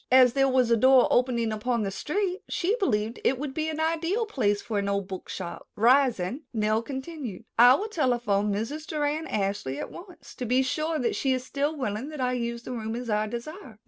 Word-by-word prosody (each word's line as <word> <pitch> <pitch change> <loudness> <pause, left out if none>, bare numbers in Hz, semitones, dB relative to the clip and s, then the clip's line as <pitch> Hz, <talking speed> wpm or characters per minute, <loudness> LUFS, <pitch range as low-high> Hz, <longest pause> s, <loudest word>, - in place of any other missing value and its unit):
As 255 -2 +7
there 270 0 +3
was 255 -2 +2
a 230 - +5
door 260 +2 +6
opening 240 -3 +2
upon 230 +1 -1
the 195 - -2
street, 370 - -2
she 385 +5 0
believed 220 - 0
it 260 - +2
would 280 0 -4
be 315 +1 -1
an 315 0 -4
ideal 330 +7 0
place 205 - 0
for 210 -1 -2
an 200 0 -1
old 200 -1 -1
book 190 -2 -7
shop. 175 -2 -6
Rising, 245 -1 +3
Nell 215 0 +1
continued: 265 - -6
"I 245 +2 +9
will 415 +9 -2
telephone 240 - +1
Mrs. 255 +10 -3
Doran 300 +1 -1
Ashley 195 -9 -2
at - - -5
once 360 0 -12
to 250 - -3
be 255 +3 +3
sure 310 +4 -1
that 245 - 0
she 265 -1 +1
is 255 -1 -2
still 285 +4 -2
willing 245 +1 -3
that 305 -2 -8
I 250 -1 0
use 235 -1 -3
the - - -7
room 225 -2 -4
as 240 -1 -4
I 210 0 +1
desire." 240 - -7
250 Hz, 210 wpm, -27 LUFS, 215-300 Hz, -, I